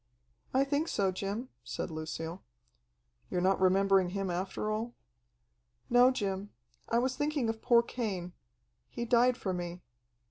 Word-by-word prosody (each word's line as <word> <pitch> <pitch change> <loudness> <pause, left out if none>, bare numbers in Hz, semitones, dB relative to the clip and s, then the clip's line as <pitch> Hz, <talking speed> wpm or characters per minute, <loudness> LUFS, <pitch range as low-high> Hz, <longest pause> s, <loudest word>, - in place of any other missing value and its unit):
"I 265 +1 +4
think 285 +3 0
so, 195 -2 +1
Jim," 200 +7 -4
said - - -4
Lucille. 160 +2 -5 0.9
"You're 180 - 0
not 190 +1 +2
remembering 190 0 +4
him 195 0 -2
after 190 +4 -2
all?" 225 +3 -3 1.0
"No, 245 +1 +7
Jim. 200 -5 -2 0.4
I 230 - +2
was 255 +2 +1
thinking 290 -5 0
of 225 0 -3
poor 235 -1 +5
Cain. 195 -8 -4 0.6
He 235 - -4
died 245 +1 +4
for 190 -6 -2
me." 175 0 -5
200 Hz, 140 wpm, -31 LUFS, 185-245 Hz, 1.0 s, No